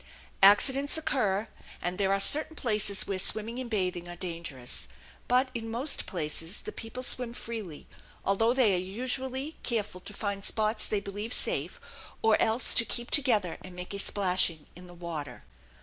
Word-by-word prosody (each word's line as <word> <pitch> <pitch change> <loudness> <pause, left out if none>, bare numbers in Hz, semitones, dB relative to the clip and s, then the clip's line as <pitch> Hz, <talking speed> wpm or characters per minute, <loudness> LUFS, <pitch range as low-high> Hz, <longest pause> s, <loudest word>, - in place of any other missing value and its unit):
Accidents 265 +9 +5
occur, 220 -9 0 0.3
and 180 +2 -4
there 195 -1 +1
are 195 - +2
certain 305 +9 +7
places 210 -6 +2
where 195 -2 -2
swimming 220 +5 +1
and 255 -2 -5
bathing 180 -5 -2
are 175 - -7
dangerous; 165 -8 -5 0.4
but 255 +2 +2
in 225 -2 -5
most 250 +6 0
places 165 +1 -3
the 430 - -6
people 250 - -7
swim 245 -2 +1
freely, 220 -10 -7 0.4
although 225 +4 +2
they 245 -6 +3
are 180 - +1
usually 260 - -3
careful 210 -6 -3
to 205 - -6
find 200 -1 -4
spots 215 +1 -1
they 210 -2 -1
believe 205 +4 -6
safe - - -1 0.4
or 220 -1 +5
else 225 +3 +2
to - - +4
keep 240 +1 -3
together 220 - +2
and 185 -1 -11
make 180 +2 -7
a 200 - -3
splashing 180 -6 +1
in 180 +1 -12
the 175 - -13
water. 170 -4 -7
210 Hz, 165 wpm, -29 LUFS, 180-240 Hz, 0.4 s, certain